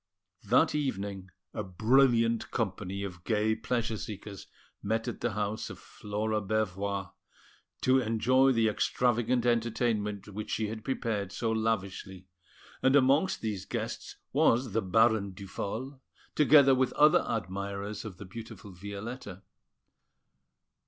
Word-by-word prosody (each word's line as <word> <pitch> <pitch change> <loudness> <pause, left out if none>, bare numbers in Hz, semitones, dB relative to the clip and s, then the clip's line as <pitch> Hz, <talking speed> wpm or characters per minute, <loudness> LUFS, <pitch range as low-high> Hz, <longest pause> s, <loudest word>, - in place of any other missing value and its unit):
That 125 +10 +4
evening 100 -10 -3 0.2
a - - -3
brilliant 115 +3 +3
company 100 -2 -3
of 90 -3 -7
gay 110 0 +1
pleasure 115 -2 -2
seekers 100 -1 -8 0.3
met 110 +2 -1
at - - -5
the 120 -3 -1
house 105 +1 -2
of - - -8
Flora 105 +1 -3
Bervoix, 100 -2 -2 0.7
to 130 +1 +4
enjoy 130 +3 +3
the 115 -3 +3
extravagant 120 +2 +1
entertainment 110 -3 0
which 105 +2 -6
she 110 -2 -1
had 110 0 -6
prepared 110 -7 -2
so 115 +1 -1
lavishly; 100 -4 -2 0.6
and 130 +1 +4
amongst 145 +7 +3
these 105 -4 -3
guests - - -5 0.2
was 120 0 +3
the 115 +3 +1
Baron 110 0 +2
Duphol, 110 +7 -6 0.3
together 140 -2 +6
with 130 -1 +1
other 150 +1 +5
admirers 100 0 -4
of 105 -6 -8
the 105 - -9
beautiful 105 0 -9
Violetta. 100 +2 -7
110 Hz, 125 wpm, -30 LUFS, 100-120 Hz, 0.7 s, together